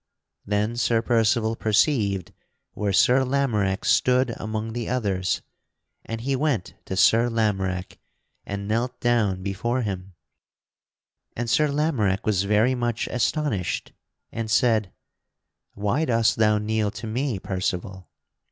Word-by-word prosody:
Then 105 +3 0
Sir 115 -1 +2
Percival 115 -1 +2
perceived 105 - +1 0.4
where 105 -1 -2
Sir 125 +7 +4
Lamorack 115 -8 0
stood 125 -1 +3
among 110 +1 -4
the 120 -1 -4
others, 100 -7 -1 0.6
and 115 0 -5
he 135 +3 0
went 130 - -1
to 95 - -4
Sir 115 +5 +5
Lamorack 95 -5 -1 0.4
and 100 0 -5
knelt 120 +4 -1
down 105 -6 +1
before 120 +6 -1
him; 95 -2 -5 1.2
and 120 0 -3
Sir 150 +6 +3
Lamorack 140 -10 0
was 100 -3 +1
very 105 +5 +3
much 120 -3 -1
astonished, 125 - -1 0.4
and 115 -1 -4
said: 110 -4 +2 0.8
"Why 105 +10 0
dost 115 -3 +2
thou 105 -1 +4
kneel 105 0 0
to 115 - -8
me, 120 +1 -1
Percival?" 95 0 -4
110 Hz, 125 wpm, -24 LUFS, 100-120 Hz, 1.2 s, Sir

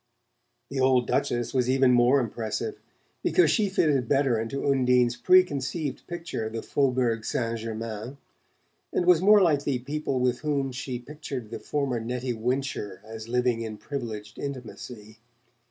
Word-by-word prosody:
The 135 - -2
old 130 -1 +4
Duchess 120 0 -1
was 125 -2 +1
even 130 -1 +4
more 125 +3 +5
impressive, 120 - -3 0.4
because 360 - +4
she 210 -4 +2
fitted 145 -9 +2
better 135 -5 +2
into 115 +5 -4
Undine's 125 -3 +3
preconceived 155 -5 +2
picture 170 -9 -4
of 110 - -8
the 115 - -4
Faubourg 125 -5 +1
Saint 115 -1 -2
Germain, 110 +3 -5 0.7
and 175 - 0
was 180 -2 +5
more 205 +1 +7
like 150 -5 +3
the 140 -3 0
people 140 +1 -2
with 125 -1 +1
whom 140 -3 -1
she 130 0 -4
pictured 135 -3 -7
the - - -5
former 140 -5 -1
Nettie 125 +2 -3
Wincher 120 -4 -2
as 110 +1 -9
living 125 -1 +1
in 110 -2 -5
privileged 110 -6 -6
intimacy. 120 -5 -8
125 Hz, 150 wpm, -27 LUFS, 115-140 Hz, 0.7 s, more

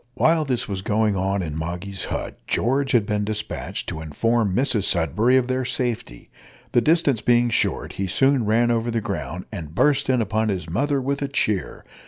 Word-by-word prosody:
While 160 -1 +3
this 125 -4 -1
was 100 -2 -3
going 105 +1 +1
on 95 +1 0
in 75 -3 -5
Moggy's 90 +5 -4
hut, - - -5
George 135 +3 +1
had 115 -4 +4
been 105 0 -1
despatched 105 0 -3
to 80 -2 -5
inform 100 +6 0
Mrs 125 -6 +2
Sudberry 100 - +2
of 125 -1 +1
their 130 0 -1
safety. 120 - -3 0.4
The 120 - +4
distance 150 -4 +2
being 120 0 +3
short, - - 0
he 95 - -3
soon 135 +6 +3
ran 115 +3 +3
over 115 0 0
the 115 0 0
ground, 90 -4 -5
and 80 -1 -7
burst 145 +2 +2
in 130 -1 +3
upon 110 0 0
his 90 -5 -3
mother 140 - 0
with 140 +2 -2
a 140 - -1
cheer. 105 -8 -1
110 Hz, 190 wpm, -23 LUFS, 95-130 Hz, 0.4 s, had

